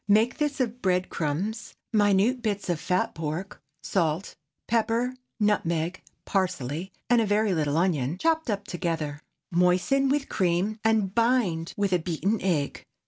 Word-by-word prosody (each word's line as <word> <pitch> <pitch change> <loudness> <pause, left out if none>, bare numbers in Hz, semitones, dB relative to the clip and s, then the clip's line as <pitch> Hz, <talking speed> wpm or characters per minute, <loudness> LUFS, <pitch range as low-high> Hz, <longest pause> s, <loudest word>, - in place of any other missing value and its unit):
Make 220 +4 +3
this 295 -2 0
of 245 -1 -1
bread 185 -1 +1
crumbs, 185 +9 -3 0.2
minute 210 +4 +3
bits 205 -4 -2
of 170 -3 0
fat 180 +3 0
pork, 160 +4 -5 0.2
salt, 170 0 0 0.3
pepper, 230 +2 +1 0.3
nutmeg, 175 -4 0 0.2
parsley, 180 -3 -1 0.2
and 240 -1 +4
a - - +2
very 205 0 +2
little 150 -2 0
onion, 165 -4 +1
chopped 320 - +1
up 205 -1 -1
together. 165 -5 -3 0.3
Moisten 180 +11 +3
with 280 0 +1
cream, 185 +4 0
and 220 -4 +2
bind 230 -9 +1
with 200 -2 +1
a 180 - +4
beaten 180 +6 -1
egg. 160 -7 -1
190 Hz, 140 wpm, -27 LUFS, 170-225 Hz, 0.3 s, and